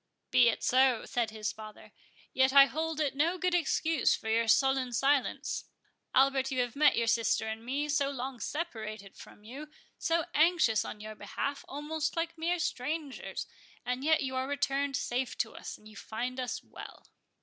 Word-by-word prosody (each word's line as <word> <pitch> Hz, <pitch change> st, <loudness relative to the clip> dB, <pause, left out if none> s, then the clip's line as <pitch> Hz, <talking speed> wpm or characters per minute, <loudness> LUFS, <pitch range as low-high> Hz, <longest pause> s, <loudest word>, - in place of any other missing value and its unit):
"Be 240 Hz, -2 st, +6 dB
it -, -, -2 dB
so," 255 Hz, -2 st, +3 dB
said 235 Hz, -2 st, -1 dB
his 215 Hz, -1 st, -3 dB
father; 215 Hz, -1 st, -12 dB, 0.4 s
"yet 265 Hz, 0 st, +3 dB
I 275 Hz, -1 st, +10 dB
hold 315 Hz, +2 st, -3 dB
it 290 Hz, -3 st, 0 dB
no 330 Hz, +6 st, +1 dB
good 365 Hz, 0 st, 0 dB
excuse 325 Hz, -3 st, +2 dB
for 220 Hz, -, -6 dB
your 230 Hz, +1 st, +2 dB
sullen 265 Hz, +1 st, +3 dB
silence. 275 Hz, +3 st, 0 dB, 0.5 s
Albert, 270 Hz, 0 st, +4 dB
you 260 Hz, -, -2 dB
have 245 Hz, -2 st, -3 dB
met 295 Hz, -2 st, +4 dB
your 230 Hz, -, +2 dB
sister 230 Hz, -1 st, +2 dB
and 220 Hz, +1 st, -5 dB
me, 280 Hz, +5 st, -2 dB
so 285 Hz, -2 st, +1 dB
long 260 Hz, -2 st, -5 dB
separated 220 Hz, -, -5 dB
from 210 Hz, -, -14 dB
you, 275 Hz, +7 st, -9 dB, 0.3 s
so 330 Hz, -1 st, +1 dB
anxious 310 Hz, -, +3 dB
on 210 Hz, -, -7 dB
your 215 Hz, 0 st, -7 dB
behalf, 215 Hz, +7 st, -4 dB
almost 300 Hz, +2 st, -3 dB
like 330 Hz, 0 st, -2 dB
mere 335 Hz, +2 st, 0 dB
strangers, 295 Hz, -1 st, -3 dB, 0.4 s
and 250 Hz, +2 st, -2 dB
yet 315 Hz, +1 st, +3 dB
you 260 Hz, -1 st, -3 dB
are 260 Hz, 0 st, -1 dB
returned 280 Hz, 0 st, -1 dB
safe 250 Hz, -1 st, -2 dB
to 220 Hz, -, -1 dB
us, -, -, -7 dB
and 215 Hz, -, -17 dB
you 215 Hz, -, -14 dB
find 245 Hz, +5 st, -4 dB
us 250 Hz, -1 st, -3 dB
well." -, -, -11 dB
265 Hz, 180 wpm, -31 LUFS, 230-300 Hz, 0.5 s, I